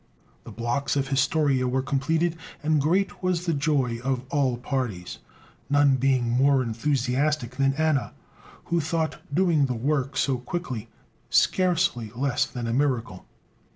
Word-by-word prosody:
The -, -, -9 dB
blocks 120 Hz, +5 st, -1 dB
of 140 Hz, -, +2 dB
the 135 Hz, -, -10 dB
"Historia" 135 Hz, -1 st, +2 dB
were 130 Hz, +1 st, 0 dB
completed, 160 Hz, +5 st, 0 dB, 0.3 s
and 155 Hz, -1 st, +2 dB
great 185 Hz, +7 st, 0 dB
was 180 Hz, -2 st, 0 dB
the 170 Hz, -, +1 dB
joy 140 Hz, -5 st, 0 dB
of 130 Hz, -1 st, -1 dB
all 135 Hz, -4 st, +1 dB
parties, 120 Hz, -9 st, -4 dB, 0.5 s
none 145 Hz, -2 st, +4 dB
being 130 Hz, -2 st, +2 dB
more 130 Hz, +3 st, +3 dB
enthusiastic 130 Hz, +2 st, -1 dB
than 135 Hz, 0 st, +2 dB
Anna, 155 Hz, -4 st, 0 dB, 0.5 s
who 170 Hz, 0 st, 0 dB
thought 160 Hz, +1 st, -2 dB
doing 160 Hz, -3 st, +3 dB
the 125 Hz, -, -2 dB
work 135 Hz, +2 st, -1 dB
so 130 Hz, -3 st, +1 dB
quickly, 125 Hz, -5 st, -5 dB, 0.4 s
scarcely 175 Hz, -, +2 dB
less 135 Hz, 0 st, 0 dB
than 120 Hz, -2 st, -6 dB
a 115 Hz, -, -1 dB
miracle. 125 Hz, -8 st, -1 dB
135 Hz, 145 wpm, -25 LUFS, 125-155 Hz, 0.5 s, none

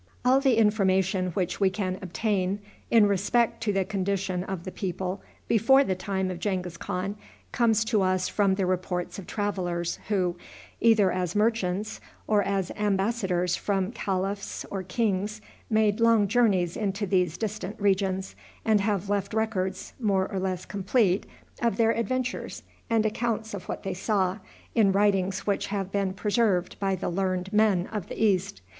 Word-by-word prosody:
All 260 Hz, +2 st, +5 dB
the 265 Hz, -4 st, +3 dB
information 190 Hz, -3 st, +2 dB
which 185 Hz, -3 st, -1 dB
we 195 Hz, -2 st, +4 dB
can 185 Hz, -1 st, -3 dB
obtain 190 Hz, 0 st, -1 dB, 0.3 s
in 225 Hz, -3 st, +6 dB
respect 205 Hz, +5 st, +1 dB
to 225 Hz, -2 st, +1 dB
the 195 Hz, -1 st, +1 dB
condition 190 Hz, -2 st, -1 dB
of 190 Hz, -3 st, -5 dB
the 185 Hz, -, -6 dB
people 185 Hz, 0 st, -3 dB, 0.3 s
before 250 Hz, +5 st, +5 dB
the 190 Hz, -, 0 dB
time 190 Hz, 0 st, -2 dB
of 175 Hz, -, -6 dB
Genghis 180 Hz, -3 st, -2 dB
Khan 185 Hz, +4 st, -3 dB, 0.4 s
comes 225 Hz, -2 st, +2 dB
to 220 Hz, -2 st, +2 dB
us 185 Hz, -1 st, +1 dB
from 200 Hz, -2 st, +2 dB
the 190 Hz, -1 st, 0 dB
reports 180 Hz, 0 st, -2 dB
of 185 Hz, -, -10 dB
travelers 175 Hz, -5 st, -2 dB
who, 185 Hz, -4 st, 0 dB, 0.4 s
either 220 Hz, -5 st, +4 dB
as 180 Hz, -1 st, -2 dB
merchants, 210 Hz, -2 st, 0 dB, 0.2 s
or 210 Hz, -1 st, +3 dB
as 195 Hz, -2 st, -1 dB
embassadors 195 Hz, -3 st, 0 dB
from 195 Hz, -1 st, -1 dB
caliphs 195 Hz, -2 st, -3 dB
or 195 Hz, -, -2 dB
kings, 205 Hz, +2 st, -1 dB, 0.3 s
made 215 Hz, -1 st, +2 dB
long 230 Hz, -3 st, +4 dB
journeys 195 Hz, -6 st, +2 dB
into 205 Hz, -1 st, -1 dB
these 180 Hz, -4 st, +1 dB
distant 215 Hz, -1 st, -4 dB
regions, 195 Hz, -1 st, 0 dB, 0.3 s
and 215 Hz, -2 st, +4 dB
have 205 Hz, -2 st, 0 dB
left 200 Hz, +1 st, -1 dB
records, 190 Hz, -4 st, -2 dB
more 195 Hz, -4 st, +1 dB
or 195 Hz, -, -2 dB
less 185 Hz, -1 st, -2 dB
complete, 195 Hz, +1 st, +1 dB, 0.3 s
of 235 Hz, -1 st, +1 dB
their 225 Hz, -1 st, +4 dB
adventures, 250 Hz, +3 st, -2 dB, 0.3 s
and 225 Hz, -1 st, +2 dB
accounts 220 Hz, 0 st, -1 dB
of 200 Hz, -, -7 dB
what -, -, -4 dB
they 195 Hz, -, -2 dB
saw, 190 Hz, 0 st, 0 dB, 0.3 s
in 215 Hz, -4 st, +4 dB
writings 195 Hz, -1 st, +1 dB
which 200 Hz, -1 st, 0 dB
have 195 Hz, -2 st, -3 dB
been 195 Hz, -1 st, 0 dB
preserved 200 Hz, -2 st, +1 dB
by 195 Hz, -1 st, +1 dB
the 185 Hz, -, -4 dB
learned 185 Hz, +1 st, -1 dB
men 210 Hz, -4 st, +3 dB
of 210 Hz, -5 st, -3 dB
the -, -, -7 dB
East. 190 Hz, -, +1 dB
195 Hz, 160 wpm, -27 LUFS, 185-215 Hz, 0.4 s, in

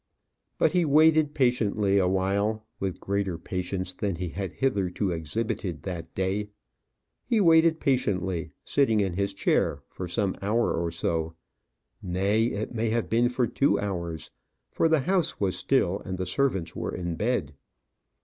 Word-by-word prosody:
But -, -, +3 dB
he 180 Hz, -1 st, +2 dB
waited 155 Hz, 0 st, +4 dB
patiently 105 Hz, -6 st, +2 dB
awhile 100 Hz, +4 st, 0 dB
with 95 Hz, -2 st, -3 dB
greater 100 Hz, -3 st, -1 dB
patience 90 Hz, +1 st, -4 dB
than 100 Hz, 0 st, -2 dB
he 90 Hz, +1 st, -4 dB
had 95 Hz, +1 st, -5 dB
hitherto 100 Hz, -7 st, 0 dB
exhibited 85 Hz, 0 st, -3 dB
that 90 Hz, -3 st, -6 dB
day. 95 Hz, +2 st, -1 dB, 0.7 s
He 235 Hz, -3 st, +1 dB
waited 165 Hz, -3 st, +5 dB
patiently, 95 Hz, -, 0 dB, 0.2 s
sitting 125 Hz, -7 st, +2 dB
in 95 Hz, -3 st, 0 dB
his 100 Hz, +2 st, -1 dB
chair -, -, +1 dB
for 90 Hz, -, -7 dB
some 95 Hz, +2 st, 0 dB
hour 110 Hz, +4 st, +1 dB
or 85 Hz, 0 st, -1 dB
so; 80 Hz, 0 st, -2 dB, 0.7 s
nay, 100 Hz, +5 st, +1 dB
it 110 Hz, -1 st, -3 dB
may 115 Hz, -1 st, 0 dB
have 115 Hz, +1 st, -1 dB
been 120 Hz, +2 st, +3 dB
for 125 Hz, 0 st, +1 dB
two 140 Hz, +5 st, +2 dB
hours, 85 Hz, -5 st, -4 dB, 0.4 s
for -, -, +2 dB
the 160 Hz, -3 st, +3 dB
house 180 Hz, +1 st, 0 dB
was 95 Hz, -3 st, 0 dB
still, -, -, +1 dB
and 95 Hz, 0 st, -5 dB
the 95 Hz, -, -2 dB
servants 95 Hz, -4 st, -1 dB
were -, -, -3 dB
in 85 Hz, -2 st, -3 dB
bed. 100 Hz, -, -1 dB
100 Hz, 150 wpm, -27 LUFS, 90-120 Hz, 0.7 s, waited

